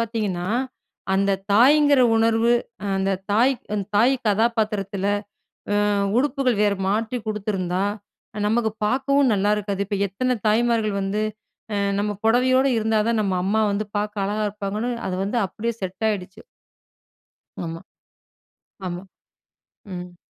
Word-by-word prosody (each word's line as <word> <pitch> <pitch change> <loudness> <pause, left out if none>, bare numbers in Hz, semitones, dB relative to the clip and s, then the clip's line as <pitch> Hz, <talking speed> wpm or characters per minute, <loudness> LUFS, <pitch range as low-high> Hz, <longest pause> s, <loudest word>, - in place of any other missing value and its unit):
பார்த்தீங்கன்னா, 210 -6 -2 0.7
அந்த 195 0 +2 0.2
தாய்ங்கிற 285 +4 +6 0.2
உணர்வு, 225 +1 +3 0.4
அந்த 195 0 0 0.2
தாய் 250 +5 +4 0.4
தாய் 245 +5 +5
கதாபாத்திரத்தில, 210 -3 0 0.8
அ - - +2 0.3
உடுப்புகள் 260 -5 +1
வேறு 205 -2 +2
மாற்றி 225 +4 -1
குடுத்துருந்தா, 195 -3 -1 0.6
நமக்கு 225 0 +1 0.2
பாக்கவும் 270 +3 +2
நல்லாயிருக்காது. 205 0 0
இப்ப 200 0 -2
எத்தன 250 +6 -1
தாய்மார்கள் 220 -1 +2
வந்து, 195 +2 -1 0.5
அ - - 0 0.2
நம்ம 210 0 0
பொடவையோடு 255 +3 +4
இருந்தா 220 0 +1
தான், 230 -2 +1
நம்ம 190 -2 0
அம்மா 220 +3 +2
வந்து 205 +1 -2
பாக்க 210 -1 -2
அழகா 210 +2 -1
இருப்பாங்கன்னு, 210 +4 -3 0.2
அத 185 - -2
வந்து 235 +4 0
அப்டியே 230 +6 -3
செட் 190 +3 -5
ஆயிடுச்சு. 185 -3 -5 1.2
ஆமா, 165 0 -5 1.1
ஆமா. 175 +1 -4 0.9
ம். 180 0 -7
215 Hz, 115 wpm, -23 LUFS, 195-235 Hz, 1.2 s, தாய்ங்கிற